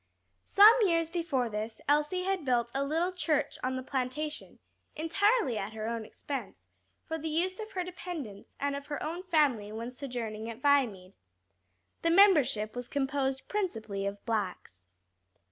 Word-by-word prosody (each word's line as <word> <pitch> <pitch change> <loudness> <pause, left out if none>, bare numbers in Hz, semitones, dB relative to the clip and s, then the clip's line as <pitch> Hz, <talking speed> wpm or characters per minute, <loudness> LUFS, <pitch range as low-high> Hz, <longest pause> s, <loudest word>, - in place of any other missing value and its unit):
Some 415 +3 +9
years 330 -5 +2
before 320 -8 0
this 220 0 -4
Elsie 300 +5 +2
had 380 -2 -1
built 240 -3 +1
a 275 +1 0
little 325 +6 0
church 310 -5 0
on 260 +1 0
the 260 - -4
plantation, 275 +4 -3 0.4
entirely 330 - +2
at 200 +3 -5
her 220 0 -4
own 230 -1 -3
expense, 275 +5 -7 0.4
for 320 0 -3
the 320 +1 -3
use 360 +5 0
of 435 0 -7
her 370 - -1
dependents 335 - -7
and 285 0 -1
of 280 0 -7
her 290 -2 -4
own 335 +3 -3
family 290 - +2
when 230 +3 -5
sojourning 235 -5 -5
at 230 0 -7
Viamede. 240 -10 +1 0.8
The 335 - +2
membership 305 - +5
was 245 0 -4
composed 270 -1 -1
principally 220 - -2
of 200 0 -6
blacks. 185 - -3
280 Hz, 155 wpm, -30 LUFS, 230-330 Hz, 0.8 s, Some